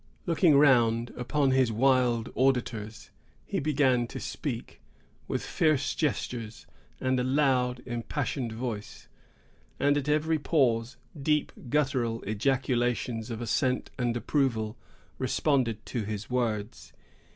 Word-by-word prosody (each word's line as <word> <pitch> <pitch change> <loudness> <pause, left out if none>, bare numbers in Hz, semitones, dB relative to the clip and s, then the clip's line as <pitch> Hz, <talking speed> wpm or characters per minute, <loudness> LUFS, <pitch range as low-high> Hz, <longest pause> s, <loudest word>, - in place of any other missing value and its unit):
Looking 165 -3 +4
round 120 -5 +4
upon 135 +3 +1
his 130 -3 +3
wild 125 -1 +2
auditors 125 -2 -1 0.3
he 195 - -2
began 135 -5 +2
to - - -7
speak, - - -5 0.5
with - - -2
fierce 145 -4 +1
gesture, 125 -7 -2 0.5
and 130 0 +1
a - - +1
loud, 130 -2 +1
impassioned 120 +1 -3
voice; 110 -2 -6 0.7
and 145 +1 +3
at 145 0 -2
every 155 +1 +2
pause, 125 -6 +1 0.2
deep, 150 +1 +1 0.2
guttural 130 -5 0
ejaculations 120 0 0
of 115 -1 -5
assent 125 +2 0
and 120 -1 0
approval 115 -4 0 0.4
responded 125 -7 0
to 120 - -3
his 105 +2 -5
words. 115 -4 -2
125 Hz, 115 wpm, -28 LUFS, 115-140 Hz, 0.7 s, Looking